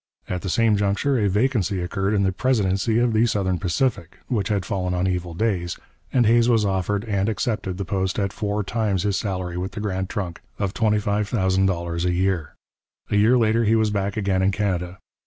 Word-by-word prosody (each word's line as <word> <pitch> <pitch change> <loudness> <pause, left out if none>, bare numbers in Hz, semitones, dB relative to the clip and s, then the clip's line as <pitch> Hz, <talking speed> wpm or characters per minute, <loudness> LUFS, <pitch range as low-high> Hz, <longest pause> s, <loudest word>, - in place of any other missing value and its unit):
At 90 -1 -3
the 95 - -4
same 110 +2 +3
juncture 105 +7 +1
a 105 -2 +2
vacancy 105 -2 +1
occurred 95 +3 -1
in 100 - +2
the 95 - +2
presidency 105 0 +1
of 120 -1 +2
the 110 +2 +3
Southern 95 -5 0
Pacific, 90 -1 -1
which 105 -7 0
had 100 -4 -1
fallen 90 -1 -2
on 90 +1 0
evil 90 -2 -2
days, 90 -5 -1 0.3
and 125 -3 +3
Hays 115 +2 +4
was 115 -3 +3
offered 100 +2 -1
and 100 -1 0
accepted 105 -4 -2
the 100 - -3
post 95 0 -1
at 100 -2 -1
four 105 0 -2
times 105 -3 -1
his 100 -2 0
salary 90 -4 -3
with 95 +3 -4
the - - -5
Grand 95 -2 -2
Trunk 90 -5 -4 0.2
of 100 -1 -2
$25,000 95 -5 0
a 90 - +1
year. 90 -4 -1 0.6
A - - +2
year 110 +5 +5
later 115 0 +2
he 110 +1 +3
was 110 -1 +2
back 100 0 -2
again 95 -3 +1
in 95 +1 +3
Canada. 90 -3 -2
100 Hz, 195 wpm, -23 LUFS, 95-110 Hz, 0.6 s, year